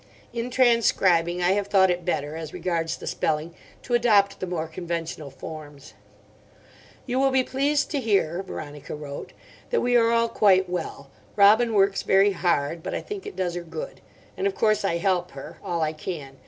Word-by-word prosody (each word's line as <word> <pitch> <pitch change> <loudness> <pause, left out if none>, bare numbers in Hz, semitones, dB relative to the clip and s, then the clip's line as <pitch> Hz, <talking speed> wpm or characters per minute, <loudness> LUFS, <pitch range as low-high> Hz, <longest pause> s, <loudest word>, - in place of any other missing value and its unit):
In 235 +1 -3
transcribing 190 -9 +3
I 175 - +4
have 200 0 0
thought 190 -2 +4
it 175 0 -2
better, 150 -3 -2
as 160 -2 -7
regards 165 -2 -2
the - - -10
spelling, 155 +2 -1 0.3
to 245 - -5
adopt 210 -5 +3
the 185 - -4
more 170 -3 -2
conventional 165 -2 -5
forms. 145 0 -10 1.1
"You 255 0 -1
will 270 0 +4
be 260 -1 +2
pleased 280 +3 0
to 290 - 0
hear," 195 -7 +1
Veronica 150 -7 -7
wrote, 145 -1 -8 0.4
"that 485 - +1
we 245 0 +1
are 230 -1 +5
all 230 0 +3
quite 190 -4 +3
well. 160 -6 -5 0.2
Robin 215 +3 +5
works 195 0 +3
very 195 +1 +4
hard. 170 -3 0
But - - -4
I - - -3
think 415 -1 -7
it 410 - -8
does 180 -2 -1
her 175 - -4
good. 485 - -8 0.3
And 395 - 0
of 390 - -2
course 215 -2 +2
I 170 -4 +1
help 180 -1 0
her. - - -10
All 170 -1 -2
I 155 0 -1
can. 150 -4 -7
185 Hz, 185 wpm, -25 LUFS, 165-230 Hz, 1.1 s, are